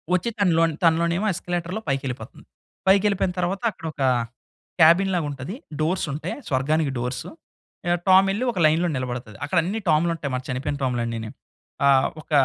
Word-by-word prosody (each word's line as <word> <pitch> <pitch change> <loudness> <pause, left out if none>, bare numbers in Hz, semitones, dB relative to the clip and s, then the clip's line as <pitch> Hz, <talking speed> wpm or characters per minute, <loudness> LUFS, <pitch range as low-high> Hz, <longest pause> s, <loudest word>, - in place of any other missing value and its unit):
వచ్చి 235 +6 0
తనలోని 165 -5 +3
తనలోనేమో 170 +3 +2
ఎస్కలేటర్‌లో 175 +4 -3
పైకేళ్ళిపోతుంది. 130 -4 -4 0.4
పైకేళ్ళిపోయిన 195 -1 +3
తరువాత 180 +4 -1
అక్కడ 165 - -12
ఒక 145 - -8 0.8
క్యాబిన్ 170 +5 +6
లాగుంటది. 145 +2 -3 0.2
డోర్సుంటాయి 155 -2 -1
స్వర్గానికి 145 +2 +1
డోర్సు. 125 +2 -4 0.6
యాహ్! 175 0 +2
టామెళ్లి 195 +4 +5
ఒక 190 - -4
లైన్‌లో 165 +3 +3
నిలబడతది. 125 -5 -5
అక్కడన్నీ 175 +7 0
టాములుంటాయి 160 -2 +1
మన 125 - -2
చనిపోయిన 140 +3 -2
టామ్‌లన్నీని. 115 -3 -2 0.6
ఆ! - - +6 0.3
ఒక - - -25
165 Hz, 125 wpm, -24 LUFS, 135-180 Hz, 0.8 s, క్యాబిన్